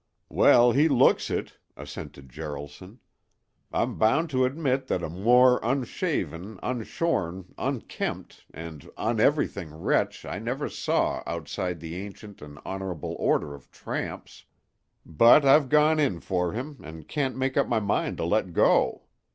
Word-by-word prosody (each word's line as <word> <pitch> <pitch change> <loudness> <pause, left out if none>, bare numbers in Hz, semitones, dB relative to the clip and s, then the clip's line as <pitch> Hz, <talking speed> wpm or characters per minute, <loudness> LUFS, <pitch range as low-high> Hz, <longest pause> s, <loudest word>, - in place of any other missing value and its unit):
"Well, 120 0 +5
he 150 +6 +3
looks 130 -2 +3
it," - - -4 0.2
assented 70 -1 -9
Jaralson. 75 - -8 0.7
"I'm - - -1
bound 150 +9 +2
to 130 -1 +2
admit 135 -1 -1
that 90 - -1
a - - -3
more 125 +7 +5
unshaven, 110 - -2
unshorn, 105 - -2
unkempt, - - -4
and 80 -2 -9
uneverything 110 - 0
wretch 80 - -1
I - - -5
never - - -3
saw - - 0
outside 85 +2 -4
the 85 +1 -6
ancient 100 +1 -9
and 75 0 -11
honorable 95 -3 -5
order 70 - +1
of 70 -3 -14
tramps. - - -6 0.6
But 115 - +6
I've 135 0 +5
gone 150 +2 +4
in 115 - +1
for 90 -1 -1
him, 135 +5 -6
and 80 -1 -10
can't 135 -4 -2
make 130 0 -1
up 140 - +2
my 115 - +1
mind 100 -1 -1
to - - -2
let 95 -1 0
go. - - +3
105 Hz, 140 wpm, -26 LUFS, 85-130 Hz, 0.7 s, But